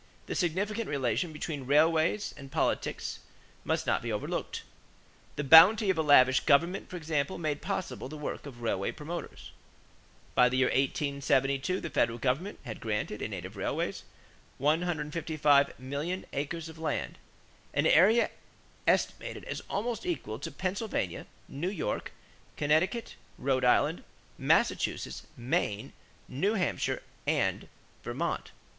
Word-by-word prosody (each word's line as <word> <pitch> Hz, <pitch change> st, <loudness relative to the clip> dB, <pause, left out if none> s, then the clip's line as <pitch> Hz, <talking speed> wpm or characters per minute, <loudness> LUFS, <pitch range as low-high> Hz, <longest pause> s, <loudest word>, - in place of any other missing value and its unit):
The -, -, -4 dB
significant 205 Hz, +5 st, -1 dB
relation 140 Hz, +5 st, 0 dB
between 150 Hz, -3 st, -5 dB
railways 160 Hz, +7 st, +3 dB
and 140 Hz, -1 st, -11 dB
politics -, -, -1 dB, 0.4 s
must -, -, 0 dB
not -, -, +1 dB
be -, -, -3 dB
overlooked. -, -, -3 dB, 0.7 s
The 150 Hz, -, -2 dB
bounty 190 Hz, +8 st, +8 dB
of 185 Hz, -, -3 dB
a -, -, +5 dB
lavish 130 Hz, -4 st, +6 dB
government, 170 Hz, +6 st, +2 dB
for -, -, -7 dB
example, 155 Hz, 0 st, -1 dB
made 155 Hz, -3 st, -2 dB
possible 190 Hz, -8 st, -4 dB
the 155 Hz, -, -7 dB
work 150 Hz, 0 st, -5 dB
of 120 Hz, -4 st, -10 dB
railway 100 Hz, -4 st, -1 dB
promoters. 160 Hz, +1 st, -7 dB, 0.8 s
By 125 Hz, 0 st, +5 dB
the 130 Hz, -, -1 dB
year 130 Hz, -, +4 dB
1872 140 Hz, +4 st, +1 dB
the 170 Hz, -, -6 dB
Federal 115 Hz, -4 st, +1 dB
government 135 Hz, -, -1 dB
had 110 Hz, -3 st, -6 dB
granted 105 Hz, -1 st, -3 dB
in 110 Hz, -, -3 dB
aid 95 Hz, -3 st, -5 dB
of 95 Hz, +3 st, -9 dB
railways 95 Hz, -, -2 dB, 0.6 s
155,000,000 150 Hz, -1 st, +1 dB
acres 155 Hz, +4 st, -3 dB
of 160 Hz, 0 st, -11 dB
land 160 Hz, -, -3 dB, 0.5 s
an 145 Hz, -, +1 dB
area 205 Hz, +9 st, +5 dB, 0.6 s
estimated -, -, 0 dB
as -, -, -5 dB
almost 225 Hz, +2 st, -2 dB
equal 125 Hz, -10 st, -3 dB
to -, -, -5 dB
Pennsylvania, 190 Hz, -, -3 dB, 0.2 s
New 165 Hz, +7 st, -3 dB
York, 195 Hz, -5 st, -3 dB, 0.5 s
Connecticut, 160 Hz, +10 st, +1 dB, 0.2 s
Rhode 130 Hz, -1 st, 0 dB
Island, 125 Hz, -, +3 dB, 0.4 s
Massachusetts, -, -, +1 dB
Maine, 120 Hz, -4 st, -1 dB, 0.3 s
New 195 Hz, +12 st, 0 dB
Hampshire, 190 Hz, -, -1 dB, 0.2 s
and -, -, +1 dB, 0.4 s
Vermont. -, -, -3 dB
150 Hz, 130 wpm, -30 LUFS, 135-175 Hz, 0.8 s, bounty